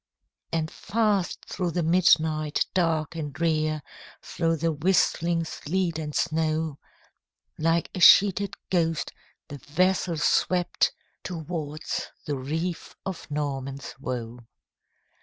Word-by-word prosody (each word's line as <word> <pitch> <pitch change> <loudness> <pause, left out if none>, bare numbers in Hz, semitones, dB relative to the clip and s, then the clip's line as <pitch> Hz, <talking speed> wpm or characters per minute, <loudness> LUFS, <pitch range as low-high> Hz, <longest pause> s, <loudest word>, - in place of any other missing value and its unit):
And 160 -1 -1
fast 210 -4 0
through 180 -2 -2
the 175 - 0
midnight 155 -3 +3
dark 165 -4 +1
and 150 -3 -4
drear, 155 -1 0 0.4
Through 165 -1 0
the 165 +2 +1
whistling 170 +1 +2
sleet 170 +1 -2
and 150 -2 -5
snow, 155 -1 0 0.8
Like 165 +1 +1
a - - -4
sheeted 200 +3 +6 0.2
ghost, 165 -3 +1 0.4
the 145 -2 -8
vessel 175 +4 +1
swept 175 +3 +2 0.3
Towards 160 -3 -4 0.2
the 145 - -1
reef 160 +6 -4
of 190 -4 -6
Norman's 140 -2 -4
Woe. 125 -3 -5
160 Hz, 105 wpm, -26 LUFS, 150-175 Hz, 0.8 s, sheeted